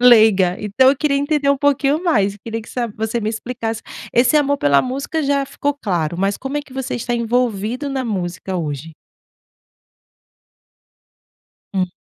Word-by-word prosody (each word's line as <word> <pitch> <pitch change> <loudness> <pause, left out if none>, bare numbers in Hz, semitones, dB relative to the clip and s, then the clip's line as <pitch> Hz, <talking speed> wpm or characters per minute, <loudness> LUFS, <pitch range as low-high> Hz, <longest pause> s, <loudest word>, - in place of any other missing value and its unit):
leiga. 215 -7 +6
Então, 215 +6 +3
eu 280 - 0
queria 280 0 +1
entender 285 0 +1
um 280 - +2
pouquinho 285 +2 +2
mais. 205 - +2
Eu - - -16
queria 225 0 -3
que - - -15
sa 245 -2 -1
você 220 +2 -3
me 215 - -1
explicasse. 225 0 -4 0.3
Esse 245 +4 +4
amor 285 -1 +3
pela 140 -1 +4
música 275 +5 -2
já 280 -1 +1
ficou 285 +1 -2
claro. 175 - -2
Mas, 195 +1 +1
como 270 +2 -4
é - - -4
que 280 - -17
você 265 -1 -3
está 240 +1 -2
envolvido 235 +2 0
na 270 -1 -2
música 185 -3 -3
hoje? 155 -1 -4 2.8
Hum. 185 -2 +1
240 Hz, 165 wpm, -19 LUFS, 200-275 Hz, 2.8 s, leiga